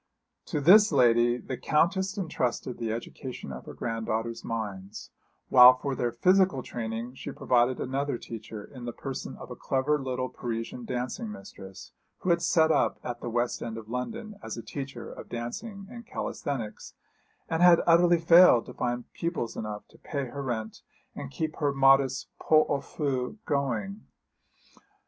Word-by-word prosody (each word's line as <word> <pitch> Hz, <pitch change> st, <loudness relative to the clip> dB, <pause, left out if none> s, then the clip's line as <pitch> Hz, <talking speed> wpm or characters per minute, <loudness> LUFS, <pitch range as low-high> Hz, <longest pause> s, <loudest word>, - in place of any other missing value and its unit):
To -, -, -1 dB
this 205 Hz, +8 st, +7 dB
lady 120 Hz, -3 st, +4 dB
the 125 Hz, 0 st, -6 dB
Countess 190 Hz, -, +1 dB
entrusted 130 Hz, -9 st, -2 dB
the 115 Hz, -2 st, -2 dB
education 120 Hz, -, -6 dB
of 65 Hz, -1 st, -8 dB
her -, -, -9 dB
granddaughters' 115 Hz, 0 st, -3 dB
minds, 105 Hz, -2 st, -5 dB, 0.4 s
while 125 Hz, 0 st, +9 dB
for 140 Hz, +1 st, -3 dB
their 120 Hz, -2 st, -1 dB
physical 180 Hz, +2 st, +3 dB
training 115 Hz, +1 st, -5 dB
she 130 Hz, -, -7 dB
provided 125 Hz, 0 st, +2 dB
another 135 Hz, +1 st, -2 dB
teacher 110 Hz, -2 st, -8 dB
in 125 Hz, -3 st, -10 dB
the 120 Hz, -, -4 dB
person 135 Hz, -2 st, -6 dB
of -, -, -10 dB
a -, -, -5 dB
clever 140 Hz, +3 st, 0 dB
little 130 Hz, -1 st, -2 dB
Parisian 115 Hz, 0 st, -5 dB
dancing 130 Hz, -, -4 dB
mistress, 95 Hz, -, -11 dB, 0.3 s
who 185 Hz, -, +1 dB
had 170 Hz, 0 st, +2 dB
set 160 Hz, -2 st, +3 dB
up -, -, +1 dB
at 120 Hz, -1 st, -5 dB
the -, -, -4 dB
West 120 Hz, +1 st, -1 dB
End 115 Hz, -1 st, -5 dB
of 110 Hz, -1 st, -9 dB
London 215 Hz, -, -5 dB
as 110 Hz, 0 st, -6 dB
a 115 Hz, -, -6 dB
teacher 135 Hz, -3 st, -7 dB
of -, -, -11 dB
dancing 195 Hz, -, -6 dB
and 235 Hz, -2 st, -10 dB
calisthenics, 120 Hz, -7 st, -5 dB, 0.5 s
and 165 Hz, +1 st, -1 dB
had 175 Hz, -1 st, +7 dB
utterly 175 Hz, +1 st, +5 dB
failed 165 Hz, -7 st, +7 dB
to -, -, -10 dB
find 120 Hz, 0 st, -2 dB
pupils 165 Hz, -9 st, -3 dB
enough 105 Hz, -1 st, -6 dB
to -, -, -21 dB
pay 140 Hz, -2 st, -4 dB
her 140 Hz, +3 st, -6 dB
rent 115 Hz, -5 st, -4 dB, 0.3 s
and 70 Hz, -, -7 dB
keep 155 Hz, -, -4 dB
her 145 Hz, -2 st, +1 dB
modest 135 Hz, -1 st, +4 dB
pot 155 Hz, -1 st, +4 dB
au 140 Hz, -, 0 dB
feu 135 Hz, -, -3 dB
going. 120 Hz, -9 st, -1 dB
125 Hz, 165 wpm, -28 LUFS, 115-155 Hz, 0.5 s, while